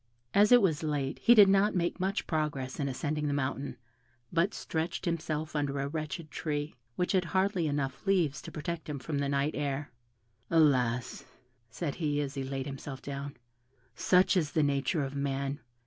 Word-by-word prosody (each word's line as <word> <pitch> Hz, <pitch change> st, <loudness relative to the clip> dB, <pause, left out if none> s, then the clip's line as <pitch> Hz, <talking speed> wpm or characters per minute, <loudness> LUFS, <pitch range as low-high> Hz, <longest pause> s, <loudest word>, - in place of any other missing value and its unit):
As 205 Hz, +2 st, +5 dB
it 245 Hz, -3 st, +8 dB
was 160 Hz, -6 st, +2 dB
late, 145 Hz, -4 st, -2 dB
he 240 Hz, -, +6 dB
did 205 Hz, -3 st, +9 dB
not 195 Hz, +2 st, +4 dB
make 175 Hz, +1 st, 0 dB
much 190 Hz, +2 st, -1 dB
progress 145 Hz, -5 st, -2 dB
in 140 Hz, -1 st, 0 dB
ascending 150 Hz, +3 st, -2 dB
the 145 Hz, -, 0 dB
mountain, 135 Hz, -1 st, -2 dB, 0.6 s
but 170 Hz, +4 st, +3 dB
stretched 165 Hz, -1 st, -3 dB
himself 155 Hz, -2 st, -2 dB
under 145 Hz, -1 st, 0 dB
a 140 Hz, -, -1 dB
wretched 155 Hz, +1 st, -5 dB
tree, 145 Hz, 0 st, -3 dB, 0.2 s
which 180 Hz, -, 0 dB
had 185 Hz, -2 st, +2 dB
hardly 190 Hz, -2 st, +1 dB
enough 145 Hz, +3 st, -2 dB
leaves 175 Hz, -7 st, +2 dB
to -, -, -9 dB
protect 160 Hz, +1 st, -5 dB
him 145 Hz, -, -3 dB
from 140 Hz, +2 st, -3 dB
the 140 Hz, -1 st, 0 dB
night 140 Hz, +2 st, +1 dB
air. 145 Hz, 0 st, -2 dB, 0.6 s
"Alas!" 125 Hz, -7 st, +2 dB, 0.4 s
said 145 Hz, +4 st, -3 dB
he, 145 Hz, -2 st, +1 dB
as 140 Hz, -2 st, -2 dB
he 135 Hz, -1 st, -3 dB
laid 135 Hz, 0 st, -3 dB
himself 135 Hz, -1 st, -6 dB
down, 140 Hz, 0 st, -6 dB, 0.6 s
"such 180 Hz, -, +4 dB
is 160 Hz, -5 st, +1 dB
the 155 Hz, -, +3 dB
nature 145 Hz, +2 st, +1 dB
of 135 Hz, +1 st, -5 dB
man. 140 Hz, 0 st, -2 dB
150 Hz, 180 wpm, -30 LUFS, 140-170 Hz, 0.6 s, did